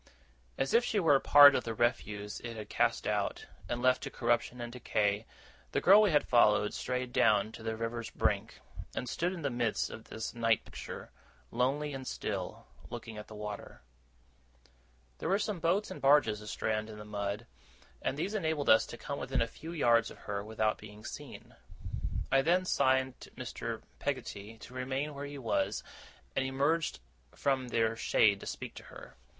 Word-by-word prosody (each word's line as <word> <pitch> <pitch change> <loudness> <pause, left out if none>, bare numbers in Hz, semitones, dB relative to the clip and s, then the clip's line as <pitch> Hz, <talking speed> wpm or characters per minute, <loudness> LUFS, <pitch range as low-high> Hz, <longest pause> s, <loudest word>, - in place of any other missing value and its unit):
As 135 - 0
if 235 - +6
she 220 -3 +1
were 165 -6 +5
a 135 - +6
part 145 0 +9
of - - +1
the 115 -1 -4
refuse 105 -3 -1
it 115 -1 -7
had 105 -1 -7
cast - - +1
out, - - -1 0.2
and 120 +1 -2
left 130 0 +4
to - - -4
corruption 120 0 0
and 120 0 -5
decay, 105 -3 0 0.5
the - - +2
girl 200 +4 +8
we 210 - +4
had 150 -4 +3
followed 105 -3 +4
strayed 125 -1 -3
down 105 0 +4
to 115 - -10
the 110 0 -2
river's 115 0 -3
brink, - - -1 0.3
and 125 - -3
stood 175 +7 -1
in 175 -4 -6
the 140 - 0
midst 120 -2 0
of 110 - -9
this 110 - -5
night 115 -1 +2
picture, - - -8 0.4
lonely 140 +5 0
and 130 -1 -6
still, - - -4 0.2
looking 110 -2 -7
at 105 - -9
the 110 - -10
water. 105 -12 -7 1.4
There - - -2
were 195 - +4
some 205 -2 -2
boats 185 +5 +1
and - - -7
barges 135 -7 +4
astrand 110 +1 -2
in 105 - -9
the 105 - -9
mud, 100 -1 -3 0.6
and 135 - -1
these 190 +7 -2
enabled 160 -8 +1
us 110 - +6
to 120 - -8
come 140 +3 -5
within 135 -2 0
a - - -3
few 160 +8 -9
yards 120 -8 +3
of - - -12
her 100 -1 -3
without 110 0 0
being 105 0 -12
seen. - - -9 0.8
I 135 0 +5
then 180 +5 +2
signed 130 -4 +2
to - - -10
Mr. 115 -3 -5 0.2
Peggotty 115 -6 -4
to 125 - -11
remain 130 +3 -2
where 140 0 -6
he 145 0 -7
was, 120 -5 -1 0.5
and - - +2
emerged 140 - 0 0.4
from 135 -2 0
their 115 -1 +1
shade 105 -3 +3
to - - -9
speak - - -5
to - - -11
her. - - -12
120 Hz, 185 wpm, -32 LUFS, 110-145 Hz, 1.4 s, part